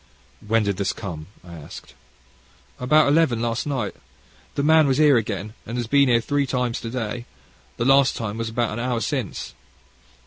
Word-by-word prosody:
"When 115 +1 +3
did 100 -2 -1
this 100 - -1
come?" 85 -7 -7 0.2
I 85 -1 -12
asked. 75 -3 -11 0.9
"About 150 +4 +4
eleven 145 -5 +3
last 115 +3 -2
night: 130 -8 -2 0.6
the 140 - 0
man 160 0 +5
was 135 - +2
here 150 -2 +5
again, 105 -2 -2
and 115 - -6
has 120 - -1
been 140 +3 +4
here 120 -1 +5
three 140 +3 0
times 125 -2 -1
to 115 - -5
day. 120 0 -4 0.5
The 120 - -1
last 135 0 +5
time 110 0 -4
is 115 - -2
about 115 -1 -1
an 110 - -4
hour 120 -1 -1
since." 130 -4 -3
120 Hz, 180 wpm, -23 LUFS, 110-135 Hz, 0.9 s, man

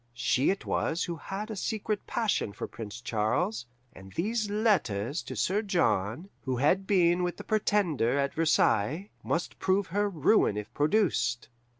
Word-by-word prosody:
She 125 +2 +2
it 195 - -1
was 165 +2 0
who 170 - -3
had 205 +7 -5
a - - -4
secret 215 +1 -3
passion 215 - 0
for - - -5
Prince 115 0 -8
Charles, 110 +1 -1 0.3
and 95 -2 -13
these 215 +4 -1
letters 165 - +1
to - - -7
Sir 200 +3 +1
John, 175 - 0
who 130 -2 -1
had 185 +9 +2
been 175 -3 +3
with 175 -1 -2
the - - -8
Pretender 195 - +1
at 140 0 0
Versailles, 155 - +2
must 170 - -2
prove 190 +1 +2
her 205 0 +2
ruin 160 - +3
if 105 - -6
produced. 145 - +1
170 Hz, 160 wpm, -29 LUFS, 120-205 Hz, 0.3 s, been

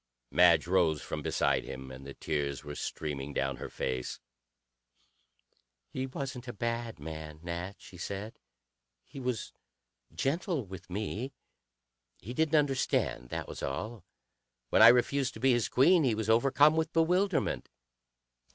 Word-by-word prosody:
Madge 85 -2 +6
rose 85 -4 +3
from - - -4
beside 65 -2 +1
him, 65 0 -8
and 65 +1 -10
the 70 - -8
tears 70 -4 -2
were 75 0 -6
streaming 70 -1 -4
down 70 -1 0
her - - -6
face. 65 -1 -3 1.7
"He 130 0 -3
wasn't 130 -1 -5
a 120 - -5
bad 115 +1 -3
man, 80 0 -7
Nat," 85 +3 -4
she 90 - -13
said. 100 +5 -5 0.7
"He - - -10
was 125 -4 -3 0.6
gentle 160 - -1
with 95 -1 -10
me. 110 +7 -3 0.8
He 115 +7 -8
didn't 160 +3 +3
understand; 130 - +1
that - - -4
was - - -7
all. 105 - -4 0.7
When - - +5
I 110 - +11
refused 130 +3 +4
to - - -8
be 135 0 +4
his 120 -2 +2
queen, 165 +6 +5
he 120 -5 +2
was 110 0 0
overcome 140 +6 +5
with 160 0 0
bewilderment. 180 +3 +1
110 Hz, 140 wpm, -31 LUFS, -, 1.7 s, I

